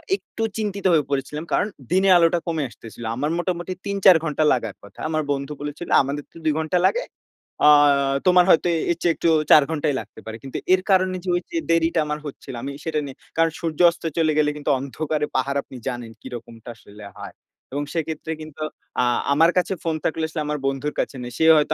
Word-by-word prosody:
একটু 225 - -7
চিন্তিত 200 -2 -3
হয়ে 155 -2 +4
পড়েছিলাম। 145 +2 -2
কারণ - - +2 0.2
দিনে 190 +2 +3
আলোটা 170 0 +3
কমে 160 -3 -1
আসতেছিল। 115 0 -12
আমার 145 +5 -1
মোটামুটি 175 0 -2
৩-৪ 195 -2 +5
ঘন্টা 155 -1 0
লাগার 115 -5 -2
কথা। 100 - -15
আমার 155 -1 0
বন্ধু 140 +1 -2
বলেছিল, 145 +4 -6
"আমাদের 140 +2 -3
তো - - -15
২ 155 - +3
ঘন্টা 160 +3 0
লাগে। - - +2 0.6
অ্যা 150 - +7 0.6
তোমার 180 -1 +6
হয়তো 170 0 +5 0.2
এর 170 - -1
চেয়ে 170 - +3
একটু 165 - +1 0.2
৪ 150 - +9
ঘন্টাই 145 -2 0
লাগতে - - -11
পারে।" 110 - -6
কিন্তু 135 - -6 0.2
এর 185 - +3
কারণে 185 -1 +3
যে - - -10
ওই 175 - 0
যে 340 - -2
দেরিটা 165 0 +2
আমার 150 0 -2
হচ্ছিল। 140 -1 -8
আমি 140 - -4
সেটা 160 -2 -1
নিয়ে 135 -2 -8 0.2
কারণ 165 0 +3
সূর্যাস্ত 170 +1 +2
চলে 160 -2 +3
গেলে 150 -1 +3
কিন্তু 145 - -3
অন্ধকারে 150 +3 -2
পাহাড় 135 +2 0
আপনি - - -13
জানেন 120 -3 -4
কিরকমটা 120 -2 -9
আসলে 105 -1 -14
হয়। - - -9 0.4
এবং 145 0 -1
সেক্ষেত্রে 160 -1 -3
কিন্তু 155 0 -7 0.4
আ - - +3 0.3
আমার 165 +4 +5
কাছে 180 +1 +1
ফোন 165 -1 0
থাকলে 160 0 0
আসলে 160 -1 -3
আমার 150 0 -2
বন্ধুর 135 +2 -2
কাছে - - -2
নেই। 120 - -6
সে 160 - +2
হয়তো 150 +1 +2
155 Hz, 200 wpm, -23 LUFS, 140-170 Hz, 0.6 s, ৪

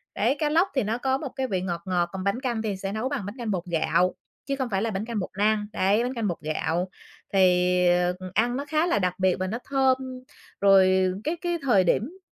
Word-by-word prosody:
Đấy, 240 +6 +2
cá 300 - +1
lóc 335 +5 +3
thì 265 - +2
nó 220 +3 -1
có 265 +1 0
một 275 -2 -5
cái 265 -1 -1
vị 190 -6 -1
ngọt 175 -2 -3
ngọt, 175 -2 0
còn 190 -1 -4
bánh 200 +5 0
canh 240 -4 -1
thì 210 -3 -2
sẽ 195 +1 -4
nấu 220 +5 -2
bằng 275 -9 -3
bánh 205 +3 -6
canh 230 -3 -3
bột 180 -3 -2
gạo, 170 +1 +1 0.3
chứ 275 - -1
không 260 -3 -3
phải 195 -2 0
là 225 - 0
bánh 200 +1 -3
canh 230 -2 -3
bột 185 - -4
năng. 210 0 +2
Đấy, 200 +5 +2
bánh 250 - -2
canh 230 -4 -2
bột 175 - -2
gạo. 165 +4 -1 0.4
Thì, 180 -1 +4
ờ, 175 0 +2
ừm, 185 -1 -8
ăn 240 +5 +1
nó 280 - -4
khá 310 +3 +1
là 210 - +2
đặc 180 -2 0
biệt 185 -1 +3
và 185 - -1
nó 220 +5 -3
thơm, 265 -1 +3 0.6
rồi, 190 -1 +5
ờ, 190 - -7
cái 315 +3 -1
cái 345 -1 -1
thời 240 -9 +4
điểm 255 - 0
205 Hz, 260 wpm, -25 LUFS, 185-255 Hz, 0.6 s, rồi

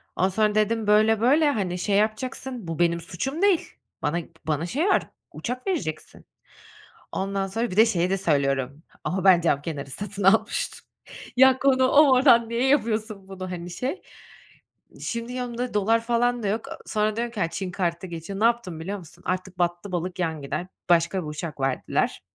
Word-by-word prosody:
Ondan 185 - +2
sonra 210 +2 +1
dedim, 215 0 +1
"Böyle, 215 +1 +4
böyle, 290 +5 +4
hani 190 -8 -2
şey 200 +2 0
yapacaksın, 230 +1 -2
bu 165 0 -4
benim 170 -1 +2
suçum 200 - -4
değil. 395 -4 +2 0.3
Bana 150 +3 0
p - - -14 0.2
bana 155 +1 0
şey 285 - -1
var, - - +2 0.2
uçak 250 +5 -5
vereceksin." 285 - -4 0.9
Ondan 195 0 -2
sonra 225 +4 -2
bir 185 - -6
de 220 +2 +7
şeyi 180 -4 +1
de 195 - +1
söylüyorum, 140 -4 0 0.2
"Ama 190 +1 -2
ben 185 -3 +7
cam 145 -4 +1
kenarı 145 -4 -5
satın 200 +6 -5
almıştım." 195 +4 +2 0.5
Ya, 265 0 +6
konu 260 -1 +3
o 295 +3 +7
mu? 275 - +4
Oradan 245 -3 +5
niye 235 +3 0
yapıyorsun 220 -7 0
bunu, 185 -1 -7
hani, 175 -1 -6
şey. 255 - -4 1.0
Şimdi 235 +1 -4
yanımda 245 -1 -4
dolar 220 +3 +2
falan 240 0 0
da 205 - 0
yok. 220 +3 -1 0.2
sonra 215 0 0
diyorum 235 +1 -2
ki, 215 - -6
"Ya, 165 - +2
Çin 185 0 -4
kartı 170 -2 -1
da 185 - -6
geçiyor." 170 +3 -6
Ne - - 0
yaptım 230 -9 0
biliyor 195 +5 -4
musun? 175 0 -14
Artık 185 0 -3
battı 175 +3 -1
balık 180 +1 -3
yan 160 -4 -1
gider, 140 +6 -4 0.2
başka 170 +2 +3
bir - - -7
uçak 150 -1 -6
verdiler. 135 -1 -1
200 Hz, 185 wpm, -25 LUFS, 175-235 Hz, 1.0 s, de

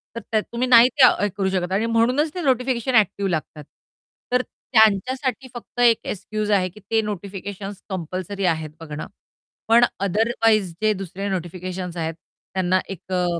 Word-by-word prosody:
तर - - -3
त्या 220 - +3
तुम्ही 235 +4 -3
नाही 245 0 +8
त्या 265 - +9
हे 205 - +2
करू 190 -1 +1
शकत 185 -1 -1
आणि 200 +4 +1
म्हणूनच 250 +7 +2
ते 360 - -3
नोटिफिकेशन 255 -2 0
ॲक्टिव 200 -2 +3
लागतात. 155 -3 -3 0.7
तर 250 0 +3
त्यांच्यासाठी 255 +4 +1
फक्त 240 0 -10
एक 235 -2 +6
एक्सक्यूज 210 +2 -3
आहे 185 -3 +2
की 185 - -15
ते 225 0 +3
नोटिफिकेशन्स 200 -1 -6
कंपल्सरी 185 +2 -4
आहेत 160 -3 0
बघणं. 155 -2 -7 0.6
पण 235 +2 +6
अदरवाइज़ 215 0 +2
जे 215 0 +3
दुसरे 195 0 -5
नोटिफिकेशन्स 180 0 -5
आहेत, 165 -1 -2 0.4
त्यांना 185 0 +2
एक 190 -1 -9
अ, 180 -1 +1
205 Hz, 155 wpm, -22 LUFS, 185-230 Hz, 0.7 s, त्या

